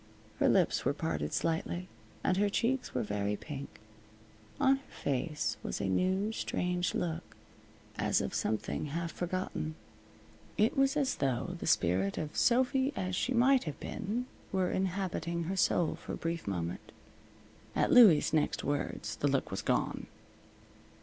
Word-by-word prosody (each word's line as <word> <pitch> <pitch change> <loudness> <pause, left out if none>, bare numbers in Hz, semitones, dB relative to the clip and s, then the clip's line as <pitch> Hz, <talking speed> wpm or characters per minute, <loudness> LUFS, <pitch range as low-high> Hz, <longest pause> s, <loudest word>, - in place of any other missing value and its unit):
Her - - +4
lips - - +3
were - - +1
parted 75 0 -2
slightly, 170 +2 -1 0.4
and 185 - +2
her 205 +1 +3
cheeks 245 +5 0
were - - +1
very 105 0 -1
pink. 140 +4 -8 0.8
On 270 +1 +5
her 275 - -18
face 150 +3 -2
was - - -4
a 100 - -1
new, 190 - +1
strange 180 -4 -1
look, 165 0 -3 0.6
as - - +2
of - - -3
something 110 +6 -1
half 165 +3 -3
forgotten. 175 -3 -3 0.8
It 215 +2 +3
was 275 +1 +3
as 275 -3 +1
though 135 +6 -1
the - - -5
spirit 95 - +2
of 155 -1 -4
Sophy 260 +2 +3
as 185 -3 -2
she 255 +6 0
might 255 0 +4
have 150 -3 -5
been 225 +3 -3 0.3
were 185 -2 +1
inhabiting 180 -2 -1
her 185 +4 -2
soul 175 -3 +2
for 175 - -7
a - - -4
brief 165 -4 -3
moment. 85 -3 -3 0.8
At - - +2
Louie's 210 -14 +7
next 155 -2 +1
words 145 0 -2
the 145 - +1
look 135 -1 0
was 95 - -2
gone. - - -1
175 Hz, 150 wpm, -32 LUFS, 145-205 Hz, 0.8 s, Louie's